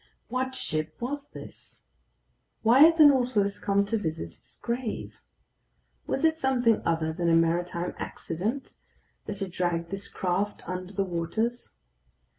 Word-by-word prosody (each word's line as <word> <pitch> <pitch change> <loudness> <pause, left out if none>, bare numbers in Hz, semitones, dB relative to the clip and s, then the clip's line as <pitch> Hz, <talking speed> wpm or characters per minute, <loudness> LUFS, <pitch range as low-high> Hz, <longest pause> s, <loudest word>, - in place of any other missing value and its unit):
What 260 +2 -2
ship 155 -6 -3
was 280 +4 -4
this? - - -12 0.8
Why 235 +4 +5
had 325 +3 +8
the 310 - +9
Nautilus 245 -8 +3
come 200 0 +2
to 225 +2 -1
visit 155 - -3
its 125 +8 -17
grave? 235 -1 -4 0.9
Was - - 0
it 320 0 +2
something 245 -5 +2
other 160 -1 0
than 170 0 0
a 165 - +5
maritime 170 +1 +1
accident 215 +12 -4 0.5
that 205 -1 -5
had 195 -2 -3
dragged 170 -1 -1
this 195 0 -5
craft 190 +2 -2
under 185 +1 -5
the 195 0 0
waters? 195 +8 -2
200 Hz, 140 wpm, -27 LUFS, 170-245 Hz, 0.9 s, the